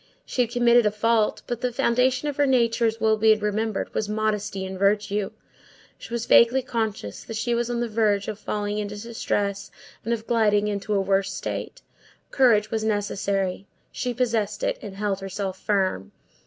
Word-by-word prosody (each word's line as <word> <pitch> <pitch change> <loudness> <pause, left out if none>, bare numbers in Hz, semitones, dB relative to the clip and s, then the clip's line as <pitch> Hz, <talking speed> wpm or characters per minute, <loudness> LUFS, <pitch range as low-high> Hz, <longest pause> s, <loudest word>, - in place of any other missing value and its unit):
She 250 - -1
had 240 - +1
committed 240 -1 +4
a - - +1
fault, 220 +1 +1
but 240 -1 -4
the 250 - 0
foundation 255 +2 +1
of 290 - -3
her 290 -1 +3
nature, 235 -2 +3
as 225 0 -2
will 220 -1 +3
be 220 0 +5
remembered, 215 0 -2
was 210 - -2
modesty 210 -2 -1
and 190 0 -6
virtue. 205 0 +1 0.7
She - - -11
was 235 -1 -2
vaguely 250 +3 +5
conscious 220 - -3
that 225 - -7
she 240 +1 0
was 235 0 0
on 240 0 -1
the 240 - 0
verge 215 -2 +1
of 215 -1 -5
falling 210 0 -2
into 205 0 -5
distress, 205 -3 -2 0.3
and 230 - -3
of 225 -1 -2
gliding 210 -3 +2
into 205 0 -2
a - - +3
worse 195 0 +1
state. - - -5 0.5
Courage 225 -5 +3
was 220 -1 -1
necessary; 200 -2 -1 0.2
she 250 - -3
possessed 225 -4 -1
it, - - -1
and 200 -2 -8
held 200 -1 -1
herself 195 -1 -4
firm. 185 - -1
215 Hz, 180 wpm, -24 LUFS, 200-235 Hz, 0.7 s, be